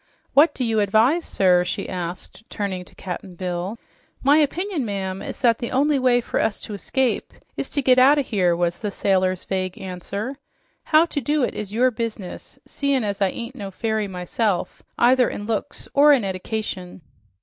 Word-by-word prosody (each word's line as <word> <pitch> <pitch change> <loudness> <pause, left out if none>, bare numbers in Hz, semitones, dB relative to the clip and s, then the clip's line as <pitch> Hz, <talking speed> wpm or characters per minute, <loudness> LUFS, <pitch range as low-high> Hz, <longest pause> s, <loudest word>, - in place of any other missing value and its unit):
What 300 +4 +5
do 255 - -2
you 225 -2 +1
advise, 220 - +3
sir?" 180 -2 +3
she 180 - -3
asked, 180 +2 -6
turning 195 -3 -3
to - - -19
Cap'n 185 0 -7
Bill. 180 +4 -3 0.5
"My 285 +3 +5
opinion, 325 +2 0
ma'am, 195 -3 -3
is - - -7
that 235 -3 +3
the 235 - -3
only 280 +2 +2
way 250 -1 +3
for - - -2
us 220 -2 0
to 215 - -7
escape 250 +5 -1 0.2
is - - -4
to 285 - -1
get 255 0 +5
out 275 +4 +6
o' 285 - +2
here," 185 -8 +1
was 175 0 -1
the 210 - -2
sailor's 185 -2 +1
vague 185 -1 -3
answer. 200 +7 -5 0.5
"How 310 +1 +5
to 295 -4 -3
do 295 +3 +1
it - - 0
is 205 -2 -5
your 250 +4 +3
business, 220 -5 -6
seein' 280 -3 0
as 205 -1 -3
I 195 - +4
ain't 235 +5 -6
no 205 -6 -6
fairy 220 +2 -2
myself, 185 +2 -2 0.2
either 250 +1 +4
in 205 - -6
looks 225 +5 -3
or 290 +1 +7
in 260 -6 +2
eddication." 190 -1 -4
215 Hz, 185 wpm, -23 LUFS, 185-260 Hz, 0.5 s, or